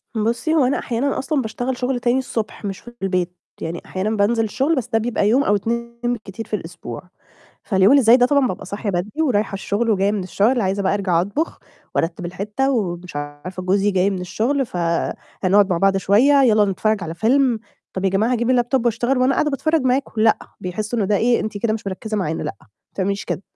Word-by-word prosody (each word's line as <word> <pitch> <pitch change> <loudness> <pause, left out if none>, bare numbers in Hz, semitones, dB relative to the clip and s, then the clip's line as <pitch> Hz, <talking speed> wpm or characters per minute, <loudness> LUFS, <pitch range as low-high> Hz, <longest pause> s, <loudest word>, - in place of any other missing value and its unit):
بُصّي، 235 +9 0
هو 280 -5 +4
أنا 265 - +1
أحيانًا 255 +4 -1
أصلًا 280 0 0
باشتغل 245 +3 -3
شُغل 250 0 -1
تاني 245 +2 +2
الصبح، 225 -4 -4
مش 195 -1 -4
في 240 - -13
البيت 180 -2 -1 0.2
يعني 165 +1 -4
أحيانًا 190 +3 -2
بانزل 225 +3 +2
الشُغل، 270 +9 0
بس 245 -2 -2
ده 225 -2 +1
بيبقى 220 -2 0
يوم 265 +5 +4
أو 205 - +3
2 235 +3 -3
بالكتير 225 -3 -4
في 210 - -1
الأسبوع، 165 - -7 0.6
فاليوم 195 +3 +4
اللي 280 -2 +6
زَي 230 +2 +7
ده 245 -1 +4
طبعًا 280 -1 +3
بابقى 180 - -5
صاحية 200 +1 -3
بدري، 200 - -2
ورايحة 210 -8 +1
الشُغل، 205 +4 -1
وجاية 200 0 +2
من 205 -3 -1
الشُغل، 220 +7 +1
عايزة 195 0 0
بقى 190 - +1
أرجع 185 -4 +1
أطبخ، 240 - -2 0.4
وأرتّب 170 +1 -1
الحِتّة، 210 +9 -2
ومش 180 - -2
عارفة 145 +6 -6
جوزي 195 +2 +2
جاي 190 +1 +2
من 185 -2 -3
الشُغل، 245 +9 0
فهنقعد 185 +3 0
مع 170 - +1
بعض 195 +1 +3
شوية، 255 +9 +4
"يالّا 215 -4 +5
نتفرج 205 +1 0
على 165 0 -5
فيلم." 245 +3 +2 0.4
"طَب 190 0 -3
يا 190 - +3
جماعة 215 +6 +1
هاجيب 245 +1 +2
الLaptop 245 0 0
وأشتغل، 240 +3 +1
وأنا 255 +2 +3
قاعدة 300 - +1
باتفرج 305 +2 +1
معاكم؟" 255 -3 0
"لأ." 220 0 +4 0.2
بيحسوا 215 +6 -3
إن 200 - +1
ده 205 0 +2
إيه 235 +3 +2
"أنتِ 215 -1 -4
كده 220 0 0
مش 220 -2 -5
مركّزة 215 +3 -4
معانا، 165 -5 -2
لأ، 150 - -4
ما - - -21 0.3
تعمليش 200 +1 -1
كده." - - -3
215 Hz, 210 wpm, -21 LUFS, 190-245 Hz, 0.6 s, زَي